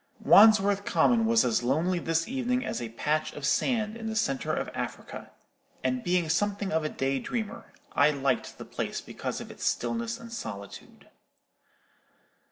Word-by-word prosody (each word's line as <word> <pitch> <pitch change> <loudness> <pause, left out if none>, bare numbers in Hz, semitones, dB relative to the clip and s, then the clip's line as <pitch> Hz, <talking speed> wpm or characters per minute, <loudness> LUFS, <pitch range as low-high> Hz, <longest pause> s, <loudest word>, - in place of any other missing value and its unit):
Wandsworth 205 -2 +6
Common 235 0 +3
was 230 0 +4
as 120 -1 +1
lonely 160 +9 +1
this 165 0 0
evening 250 0 -1
as - - -3
a 115 - -4
patch 150 +7 -1
of 145 - -5
sand 215 - +1
in 225 -1 -6
the 220 - -3
centre 135 -11 0
of - - -2
Africa; - - -6 0.5
and 130 -1 0
being 175 -1 +1
something 200 +4 0
of 160 0 +1
a 155 - -1
day 135 -1 -1
dreamer, 220 - -5 0.2
I 145 +1 +5
liked 140 -3 -1
the - - -8
place - - -4
because - - -5
of - - -8
its - - -10
stillness 235 0 -1
and 230 0 -10
solitude. 100 - -8
185 Hz, 165 wpm, -28 LUFS, 140-225 Hz, 0.5 s, Wandsworth